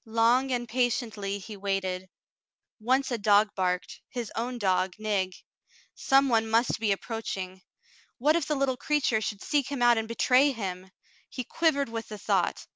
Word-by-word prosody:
Long 230 Hz, +4 st, +2 dB
and 240 Hz, -1 st, -1 dB
patiently 225 Hz, -4 st, -1 dB
he 205 Hz, +2 st, -9 dB
waited. 190 Hz, -2 st, -2 dB, 0.7 s
Once 260 Hz, +4 st, +1 dB
a 240 Hz, -, -1 dB
dog 205 Hz, +1 st, +4 dB
barked, 180 Hz, -1 st, -2 dB
— -, -, -66 dB
his 235 Hz, -3 st, -3 dB
own 245 Hz, +2 st, -3 dB
dog 185 Hz, -3 st, +1 dB
Nig. 200 Hz, -4 st, -1 dB, 0.6 s
Some 275 Hz, 0 st, +3 dB
one 225 Hz, -3 st, +2 dB
must 230 Hz, +1 st, +2 dB
be 215 Hz, -2 st, +1 dB
approaching. 195 Hz, -3 st, -4 dB, 0.6 s
What 300 Hz, +5 st, +3 dB
if 340 Hz, -4 st, 0 dB
the 300 Hz, -, 0 dB
little 270 Hz, -2 st, 0 dB
creature 270 Hz, -6 st, +1 dB
should 205 Hz, -1 st, -4 dB
seek 285 Hz, -2 st, 0 dB
him 265 Hz, -4 st, -1 dB
out 240 Hz, -1 st, +5 dB
and 220 Hz, -, -4 dB
betray 255 Hz, +4 st, +3 dB
him! 190 Hz, -4 st, -5 dB, 0.4 s
He 255 Hz, -, -5 dB
quivered 285 Hz, -1 st, +1 dB
with 225 Hz, -1 st, -5 dB
the 210 Hz, -, -7 dB
thought. 205 Hz, -, 0 dB
225 Hz, 170 wpm, -28 LUFS, 200-255 Hz, 0.7 s, out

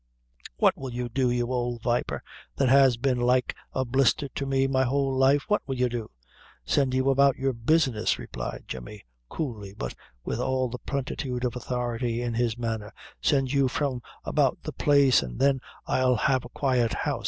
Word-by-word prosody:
"What -, -, +4 dB
will 130 Hz, -2 st, -6 dB
you 120 Hz, 0 st, -3 dB
do, 125 Hz, +1 st, +1 dB
you 120 Hz, 0 st, 0 dB
old 120 Hz, -2 st, -2 dB
viper, 120 Hz, 0 st, -1 dB, 0.3 s
that 135 Hz, -2 st, +2 dB
has 135 Hz, -2 st, +6 dB
been 125 Hz, 0 st, 0 dB
like 125 Hz, +1 st, +2 dB, 0.2 s
a 130 Hz, -, -1 dB
blister 135 Hz, +3 st, +2 dB
to 140 Hz, +2 st, -4 dB
me 135 Hz, 0 st, +2 dB
my 135 Hz, -1 st, +1 dB
whole 135 Hz, +1 st, 0 dB
life 135 Hz, +2 st, +4 dB
what 210 Hz, -1 st, +2 dB
will 135 Hz, -, -2 dB
you 125 Hz, 0 st, +1 dB
do?" 115 Hz, -2 st, -4 dB, 0.6 s
"Send 130 Hz, -, +1 dB
you 130 Hz, +1 st, +3 dB
about 140 Hz, 0 st, +4 dB
your 135 Hz, 0 st, -1 dB
business," 120 Hz, -2 st, +1 dB
replied -, -, -6 dB
Jemmy, 65 Hz, -, -8 dB, 0.3 s
coolly, 105 Hz, -10 st, -5 dB
but 60 Hz, -, -4 dB, 0.3 s
with -, -, -2 dB
all 130 Hz, -1 st, 0 dB
the 125 Hz, +1 st, -6 dB
plenitude 130 Hz, -1 st, -3 dB
of 125 Hz, -1 st, -2 dB
authority 120 Hz, -1 st, -2 dB
in 120 Hz, -1 st, -2 dB
his 115 Hz, -1 st, 0 dB
manner; 110 Hz, -3 st, -3 dB, 0.3 s
"send 135 Hz, -2 st, +2 dB
you 140 Hz, -1 st, +3 dB
from 130 Hz, -1 st, -2 dB, 0.2 s
about -, -, +2 dB
the -, -, -5 dB
place, 140 Hz, -3 st, +4 dB
an' 60 Hz, -3 st, -6 dB
then 135 Hz, -2 st, +2 dB, 0.2 s
I'll 130 Hz, -1 st, +2 dB
have 130 Hz, +3 st, +1 dB
a -, -, -9 dB
quiet 125 Hz, -5 st, +1 dB
house. -, -, -1 dB
125 Hz, 185 wpm, -26 LUFS, 120-135 Hz, 0.6 s, has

